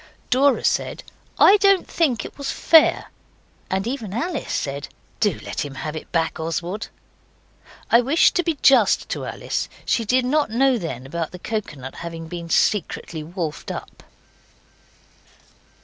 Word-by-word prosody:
Dora 270 +2 +3
said, - - 0 0.3
'I 405 - +7
don't 395 -2 +3
think 260 -10 0
it - - -9
was 280 -1 -4
fair,' 320 -1 +4 0.6
and 190 +1 -1
even 230 -5 -4
Alice 320 +3 -3
said 140 0 -3 0.3
'Do 205 -7 +1
let - - -3
him 140 -2 -7
have 150 +3 -5
it 155 - -8
back, 165 -1 0
Oswald.' 170 +6 -3 1.0
I 235 - +7
wish 280 +7 +4
to 355 - +1
be 330 -3 -1
just 245 -7 +5
to - - -3
Alice. - - -3 0.2
She 230 - +1
did 250 +3 +2
not 290 0 +1
know 255 +2 +2
then 130 - -5
about 165 +3 -3
the 180 - -9
coconut 155 - -5
having 165 -1 -7
been 170 0 -7
secretly 170 -4 0
wolfed 160 -1 -5
up. - - -7
210 Hz, 150 wpm, -22 LUFS, 165-270 Hz, 1.0 s, I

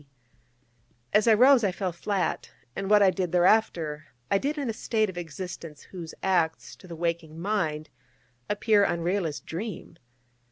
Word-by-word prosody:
As 215 +2 +4
I 225 - +7
rose, 255 +2 +6
I 200 - +2
fell 185 0 -3
flat: 185 +2 -2 0.3
and 195 0 -3
what 210 -1 +6
I 190 - +5
did 185 -3 -2
thereafter 175 -5 +2 0.3
I 195 - +4
did 295 +6 -2
in 280 -3 -2
a 225 - -1
state 220 -2 0
of 175 - -14
existence 165 -2 -8
whose 170 -4 -9
acts, 160 -10 0
to 185 - -15
the 170 - -8
waking 165 -1 -3
mind, 160 -6 -2 0.6
appear 210 0 +3
unreal 175 +1 0
as 150 - -5
dream. 175 -1 -7
185 Hz, 160 wpm, -27 LUFS, 165-210 Hz, 0.6 s, I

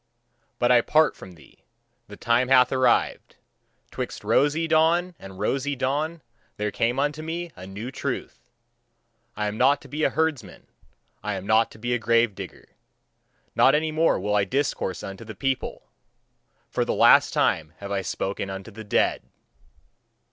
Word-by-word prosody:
But 120 0 +2
I 120 -1 +6
part 155 +5 +3
from 95 - -12
thee; 80 - -20 0.5
the - - -11
time 120 +2 +2
hath 125 -1 +5
arrived. 130 -1 +1 0.6
'Twixt - - -5
rosy 150 +3 +2
dawn 165 +3 +2
and 95 -1 -11
rosy 135 +7 -1
dawn 150 +5 -2 0.3
there 105 0 -2
came 120 +5 0
unto 145 +2 -1
me 170 +2 -5
a 95 - -10
new 105 +6 -7
truth. - - -5 1.0
I 105 - -1
am 105 +1 -3
not 140 +1 +4
to - - -13
be 155 +1 -4
a - - +4
herdsman, 160 -4 -2 0.6
I 105 -1 -3
am 95 0 -6
not 110 +2 +3
to - - -14
be 120 +3 -2
a 120 - 0
grave 115 -1 +2
digger. - - -10 0.8
Not 135 - +5
any 155 +1 0
more 160 -5 +2
will 105 +2 -1
I 100 - +3
discourse 125 -5 -2
unto 95 +3 -7
the 110 -1 -9
people; 135 +4 -2 0.8
for - - -1
the - - -2
last - - +6
time 80 -1 0
have 100 0 -8
I 100 -1 0
spoken 95 +1 -3
unto 95 +3 -7
the 110 +1 -9
dead. 105 - +1
120 Hz, 165 wpm, -25 LUFS, 105-150 Hz, 1.0 s, I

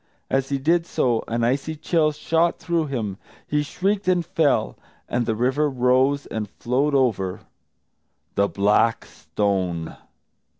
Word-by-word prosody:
As 135 0 +1
he 140 - 0
did 165 +5 +1
so, 120 -3 +1
an 115 +1 -1
icy 135 +6 0
chill 155 0 +1
shot 165 +3 +1
through 170 -3 -1
him; 110 -8 -3 0.3
he 150 0 0
shrieked 195 +6 -1
and 180 -2 +2
fell. 165 -5 +1 0.3
And 120 -1 -1
the 110 - +1
river 130 +6 +1
rose 130 +2 +2
and 105 -2 -4
flowed 135 +7 0
over 105 -9 +1 0.9
The 100 0 +2
Black 105 +3 +2
Stone. 90 -5 -2
135 Hz, 135 wpm, -23 LUFS, 110-155 Hz, 0.9 s, and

